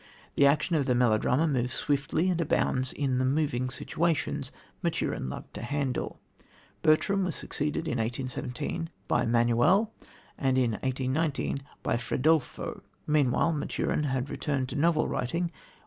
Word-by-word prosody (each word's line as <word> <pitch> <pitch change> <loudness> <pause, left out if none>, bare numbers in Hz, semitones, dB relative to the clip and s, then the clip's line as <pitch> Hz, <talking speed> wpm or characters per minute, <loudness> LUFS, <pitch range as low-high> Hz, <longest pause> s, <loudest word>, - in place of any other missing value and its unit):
The 140 - +5
action 155 +4 +2
of 145 -4 +1
the 125 - +3
melodrama 125 +5 +3
moves 125 -4 +1
swiftly, 150 +4 +1
and 175 -1 0
abounds 130 -4 +1
in 135 -3 0
the - - +2
"moving 130 -2 +1
situations" 160 +5 -1 0.3
Maturin 65 - -1
loved - - -8
to - - -6
handle. 135 +1 -2 0.6
Bertram 195 - +3
was 180 -2 -2
succeeded 150 +2 -2
in 125 -6 -1
1817 125 +7 -3 0.2
by 120 0 +2
Manuel, 120 - +3 0.5
and 130 -1 +2
in 125 -3 +3
1819 130 +6 -1 0.3
by - - +1
Fredolfo. 135 +5 0 0.2
Meanwhile 150 +2 +2
Maturin 150 0 -1
had 130 -1 -1
returned 135 -3 -1
to - - -5
novel 155 +1 +2
writing. 170 +7 -1
140 Hz, 135 wpm, -28 LUFS, 125-155 Hz, 0.6 s, The